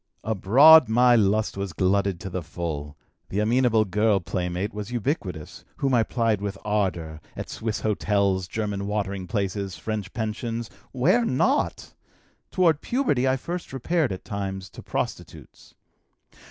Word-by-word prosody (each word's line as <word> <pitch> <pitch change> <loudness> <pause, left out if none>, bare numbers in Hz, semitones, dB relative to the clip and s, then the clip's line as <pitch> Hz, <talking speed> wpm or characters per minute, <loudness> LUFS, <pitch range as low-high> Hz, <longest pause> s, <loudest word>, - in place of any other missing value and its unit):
"Abroad 125 +9 +6
my 120 +2 +5
lust 105 0 +2
was 100 -3 -4
glutted 95 0 +1
to 95 - -5
the 90 - -3
full: 75 -2 -5 0.3
the 95 - -4
amenable 115 0 +3
girl 105 +1 +2
playmate 90 +2 -3
was 105 0 -6
ubiquitous, 110 - -3
whom 135 -1 0
I 120 - +5
plied 115 -3 0
with 100 -1 -4
ardor 90 -7 -1
at - - -6
Swiss 110 -1 -3
hotels, 100 -3 +1
German 105 -2 -3
watering 100 -2 -3
places, 100 -3 -2
French 105 +2 -4
pensions, 115 0 -4 0.2
where 175 - +3
not? 130 - 0 0.6
Toward 165 -5 +2
puberty 145 - +1
I 130 0 +2
first 175 +6 -6
repaired 140 - 0
at 95 - -6
times 95 -1 -5
to - - -10
prostitutes. - - -6
105 Hz, 140 wpm, -25 LUFS, 95-120 Hz, 0.6 s, Abroad